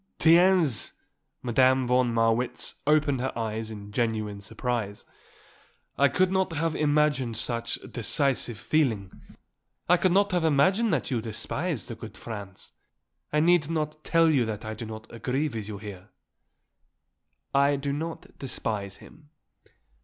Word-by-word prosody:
"Tiens!" 165 - +4 0.5
Madame 130 +2 +3
von 125 0 +2
Marwitz 115 +2 0
opened 150 -4 +3
her 130 - -1
eyes 110 -1 -3
in 105 -2 -9
genuine 110 -3 -1
surprise. 110 -1 -3 0.9
"I 140 - +4
could 185 +4 +1
not 190 -2 +1
have 160 0 -1
imagined 145 -6 +1
such, 115 0 0
decisive 125 0 0
feeling. 115 -10 0 0.8
I 180 - +5
could 185 +1 +2
not 200 +2 +3
have 175 -2 +1
imagined 185 +9 +3
that 145 -5 -1
you 120 -3 0
despised 115 - -4
the - - -5
good 110 0 -10
Franz. 100 -4 -8 0.6
I 150 - +2
need 170 -2 +3
not 155 -1 -3
tell 165 -1 +4
you 145 -6 +3
that 110 -1 -5
I 110 - -4
do 115 0 -7
not 110 0 -8
agree 130 +6 -1
with 110 -5 -5
you 105 -2 -6
there." 100 -2 -9 1.4
"I 140 +1 +4
do 140 0 -2
not 160 +3 -6
despise 105 -6 -4
him." 150 -2 -17
130 Hz, 140 wpm, -27 LUFS, 110-155 Hz, 1.4 s, I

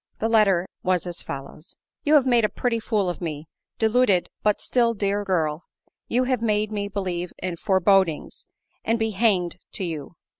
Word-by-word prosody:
The 225 - 0
letter 195 -5 +3
was 185 -1 +1
as 175 -1 -4
follows: 140 +5 -8
" - - -65
You 300 +1 +5
have 280 -3 +5
made 240 -3 +3
a 215 - +3
pretty 240 -2 -1
fool 215 -3 0
of 175 - -4
me, 155 -2 -5 0.3
deluded 220 -4 +3
but 210 -1 +2
still 235 -2 +1
dear 205 0 0
girl! 160 -6 0
for - - -42 0.2
you 250 - +4
have 255 -2 0
made 215 -1 +1
me 205 -1 -2
believe 180 -3 -3
in 180 -2 -4
forebodings, 190 -2 +1 0.4
and 225 +1 +1
be 225 -1 0
hanged 190 -4 +1
to - - -2
you. 160 -2 -5
200 Hz, 185 wpm, -24 LUFS, 175-225 Hz, 0.4 s, You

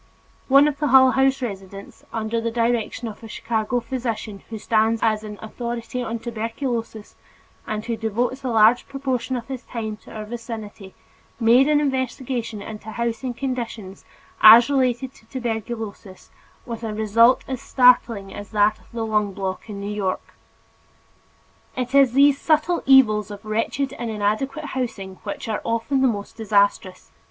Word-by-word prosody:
One 275 +2 +6
of 290 -1 -3
the 300 - +1
Hull 260 -1 +7
House 270 0 +2
residents, 195 -3 -8
under 225 +1 -2
the 230 - -1
direction 235 0 -1
of 215 - -9
a 225 - -9
Chicago 225 +2 -2
physician 230 -4 -4
who 225 - -5
stands 220 +1 +1
high 225 -1 +3
as 215 0 -6
an 210 -1 -8
authority 235 +2 -5
on 235 -1 -3
tuberculosis 230 -1 -4 0.5
and 215 0 -3
who 230 -1 -2
devotes 235 +5 -2
a 260 - -2
large 225 +1 +4
proportion 265 -2 -2
of 240 -1 -5
his 265 -2 -5
time 220 -4 -5
to - - -16
our 215 -1 -6
vicinity, 220 -4 -8 0.4
made 240 +4 +5
an 300 -1 +4
investigation 260 -5 -2
into 215 0 -8
housing 235 +2 -3
conditions 235 -7 -5 0.4
as 230 +5 +9
related 260 -1 0
to 220 - -21
tuberculosis 225 -5 -6 0.3
with 230 -2 -6
a 215 -2 -3
result 225 +3 +4
as 260 -2 -4
startling 235 -6 +3
as 205 0 -8
that 210 0 +2
of - - -24
the 230 -1 -3
"lung 210 -2 0
block" 190 +2 -5
in 200 -1 -6
New 200 +1 -4
York. 195 -3 -3 1.4
It 250 +1 -3
is 275 -3 +5
these 280 +1 +4
subtle 320 +2 +2
evils 215 -6 +5
of 205 +1 -10
wretched 230 +5 -1
and 240 -1 -3
inadequate 220 +8 -1
housing 200 -7 -4
which 205 - -6
are 215 -2 -2
often 230 +4 0
the 265 - +5
most 205 -3 -4
disastrous. 200 -4 0
230 Hz, 160 wpm, -22 LUFS, 215-255 Hz, 1.4 s, as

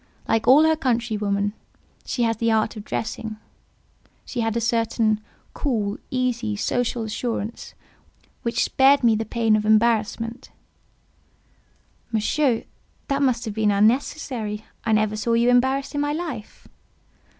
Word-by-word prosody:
Like 225 0 +1
all 275 +5 +8
her 320 0 +4
countrywomen, 215 -7 -1 0.5
she 245 - -1
had 225 -1 0
the 230 -1 +2
art 220 0 +1
of 210 - -7
dressing—she 220 +3 -8
had 225 0 0
a - - +2
certain 225 -2 +1 0.3
cool, 215 -8 -1
easy, 245 -4 -1
social 240 +2 -1
assurance, 225 0 -4 0.7
which 235 +1 0
spared 270 0 +4
me 230 -2 +5
the 225 +1 -2
pain 225 -1 +2
of 215 - 0
embarrassment—" 225 +1 +1 1.6
"Monsieur, 230 +3 +1 0.5
that 275 0 0
must 250 -3 +1
have 215 - -4
been 215 0 +1
unnecessary. 220 0 0 0.2
I 225 - +1
never 215 0 +2
saw 230 +2 -1
you 235 +1 +3
embarrassed 265 +3 +2
in 290 - -1
my 290 0 0
life." 315 -9 -6
230 Hz, 130 wpm, -23 LUFS, 215-250 Hz, 1.6 s, all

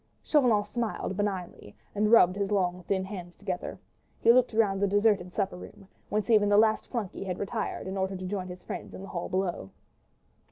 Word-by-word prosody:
Chauvelin 245 -9 +3
smiled 230 -4 -3
benignly, 190 - -4 0.2
and 210 +1 +1
rubbing 200 -4 +6
his 200 0 -1
long, 180 -3 +1
thin 190 -1 +1
hands 180 -3 -8
together, - - -5 0.4
he 230 - +6
looked 255 0 +4
round 205 -3 +2
the 200 - +3
deserted 205 -2 +2
supper 195 -1 -2
room, 195 +1 -12 0.2
whence 210 -1 -1
even 210 -2 +5
the 205 - +5
last 220 0 +3
flunkey 220 -8 -4
had 185 -2 -3
retired 200 - -3
in 190 - -4
order 190 0 -1
to 185 - -6
join 185 -1 -3
his 180 0 -9
friends - - -7
in 190 - -8
the 195 - -9
hall 175 -1 -4
below. 180 - -2
200 Hz, 195 wpm, -28 LUFS, 185-210 Hz, 0.4 s, rubbing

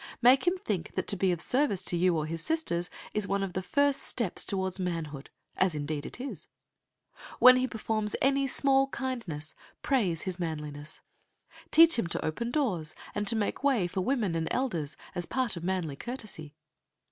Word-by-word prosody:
Make 255 +7 +5
him 360 +2 +3
think 205 - -4
that - - -1
to - - +4
be 190 -1 +2
of 175 - -1
service 250 - +1
to 175 - +2
you 175 -1 +3
or 155 - -1
his 165 +1 -3
sisters 175 - -1 0.2
is 210 -2 0
one 200 0 0
of 190 -2 -4
the 185 - -1
first 285 +7 +2
steps 230 -8 0
toward 190 -1 0
manhood, 165 -6 -4 0.3
as 185 -4 +2
indeed 145 0 -3
it - - -9
is. 265 +2 -7 0.9
When 255 0 +8
he 255 0 +1
performs 215 -2 -2
any 275 0 +2
small 270 0 +3
kindness, 230 - -4 0.3
praise 195 - +1
his 185 -1 -2
manliness. 150 -3 -5 0.7
Teach 330 -4 +6
him 175 - 0
to - - -2
open 235 +10 -2
doors, 190 - -1 0.2
and 205 0 -2
to 230 - +3
make 220 +4 -2
way 265 -10 +3
for 185 +2 -2
women 220 -4 0
and 165 -1 -1
elders, 170 - -2 0.2
as 175 - -2
a - - -21
part 255 -5 -1
of 170 - -7
manly 175 -6 -2
courtesy. 210 - -6
195 Hz, 185 wpm, -29 LUFS, 165-255 Hz, 0.9 s, When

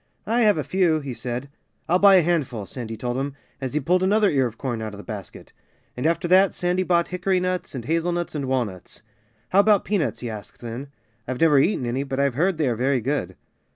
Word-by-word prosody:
"I 230 +3 +1
have 210 -5 +4
a 150 - -1
few," 165 +1 +2
he 140 -3 -6
said. 125 +3 -5 0.4
"I'll 180 +2 +3
buy 200 0 +7
a 185 - +7
handful," 140 -11 -1
Sandy 115 0 -6
told 120 +2 -3
him, 140 +1 -3 0.3
as 130 +1 -4
he - - +3
pulled 180 +6 +1
another 205 +2 +3
ear 135 -3 +2
of 115 0 -10
corn 120 -4 -3
out 110 -2 -5
of - - -11
the 105 - -9
basket. 105 -5 -9 0.4
And 125 +5 0
after 170 +1 0
that 190 +2 +4
Sandy 180 +1 0
bought 175 -2 +1
hickory 185 +1 0
nuts 185 -4 -3
and 120 -3 -5
hazelnuts 170 +3 -1
and 145 -3 -3
walnuts. 120 -9 -3 0.5
"How 190 - +3
about 205 -1 +4
peanuts?" 170 - -1
he 125 - -4
asked 105 -2 -10
then. 120 +4 -6 0.4
"I've 130 -1 -3
never 150 -4 +5
eaten 140 -3 +1
any; 120 +3 -1
but 135 -1 -4
I've 140 -2 +2
heard 170 +6 +1
they 155 -3 +1
are 120 - 0
very 130 +3 +1
good." 120 -7 -2
140 Hz, 225 wpm, -23 LUFS, 125-180 Hz, 0.5 s, buy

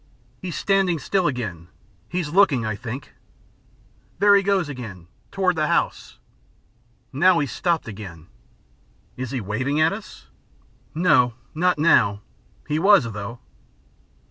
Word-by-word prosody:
"He's 180 -4 -5
standing 195 -3 +1
still 185 +5 0
again. 105 - -4 0.4
He's 175 -4 -2
looking, 150 - +3
I 110 -1 -2
think.... 125 +5 -7 1.0
There 205 +2 +5
he 200 - +5
goes 195 -4 +1
again. 110 -11 -8 0.2
Toward 185 -2 0
the 155 -1 0
house.... - - -1 1.0
Now 175 +6 +4
he's 145 -5 -1
stopped 170 -6 -1
again." 95 -7 -9 0.9
"Is 130 -1 -5
he 130 - -3
waving 130 +9 -2
at 160 +4 +3
us?" 210 +1 -10 0.7
"No, 125 -8 +3 0.2
not 180 +1 +1
now! 115 -10 +3 0.5
he 150 +1 0
was, 195 -2 +6
though." 105 +4 -7
150 Hz, 125 wpm, -23 LUFS, 115-180 Hz, 1.0 s, was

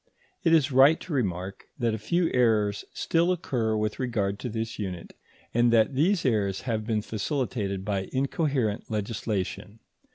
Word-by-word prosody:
It 165 - +3
is 155 -4 +4
right 135 +5 +6
to 180 - -6
remark 95 -7 -2
that 120 -4 0
a 110 - -3
few 170 - 0
errors 110 -5 +2
still 170 +2 +1
occur 120 -11 -1
with 105 0 -2
regard 105 -6 -1
to 125 - -4
this 115 0 -4
unit, 90 -4 -5 0.4
and 120 0 +4
that 115 +4 +4
these 165 +7 +2
errors 100 -6 +1
have 110 -3 -2
been 110 -3 0
facilitated 105 -5 -2
by 95 -2 -2
incoherent 135 - -1
legislation. 105 -1 -3
115 Hz, 155 wpm, -27 LUFS, 105-135 Hz, 0.4 s, right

